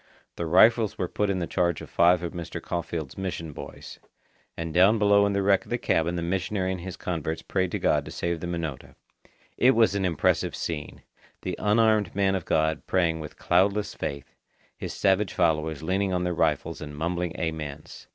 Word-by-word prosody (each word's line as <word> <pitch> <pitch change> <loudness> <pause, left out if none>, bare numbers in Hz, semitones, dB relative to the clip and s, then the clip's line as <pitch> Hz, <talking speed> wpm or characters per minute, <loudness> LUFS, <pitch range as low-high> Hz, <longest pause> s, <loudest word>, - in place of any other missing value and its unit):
The 85 - -3
rifles 110 +5 +5
were 90 - -1
put 105 +3 -1
in 95 - 0
the 90 - -1
charge 85 -2 0
of - - -9
five 85 +1 +3
of 85 - -4
Mr. 85 -2 -5
Caulfeild's 85 -3 -4
mission 85 -5 -4
boys. - - -10 0.6
And 80 -1 -4
down 95 +6 +5
below 100 -1 +4
in 100 - -1
the 100 0 +1
wreck 100 -1 +3
of - - -17
the 120 - 0
cabin 85 -6 0
the 85 - -2
missionary 95 +2 -1
and 95 -2 -4
his 90 0 -7
converts 80 -4 -3
prayed 95 -2 0
to - - -2
God - - +1
to - - -8
save 85 -1 -2
the 85 - -5
Minota. 85 -6 -5 0.6
It 130 +2 +5
was 115 -3 +4
an 100 -1 -1
impressive 85 -4 +1
scene! 75 -3 -5 0.4
the - - -3
unarmed 110 0 +2
man 95 -1 +2
of 95 -4 -2
God 80 -1 0
praying 85 -3 +1
with 75 -1 -8
cloudless 100 +4 +2
faith, 70 -1 -5 0.4
his - - -6
savage 95 0 +1
followers 80 -3 0
leaning 95 +3 0
on 90 0 0
their 90 0 0
rifles 80 -3 0
and 75 -1 -7
mumbling 85 +2 -2
amens. 75 -3 -5
90 Hz, 195 wpm, -26 LUFS, 80-100 Hz, 0.6 s, rifles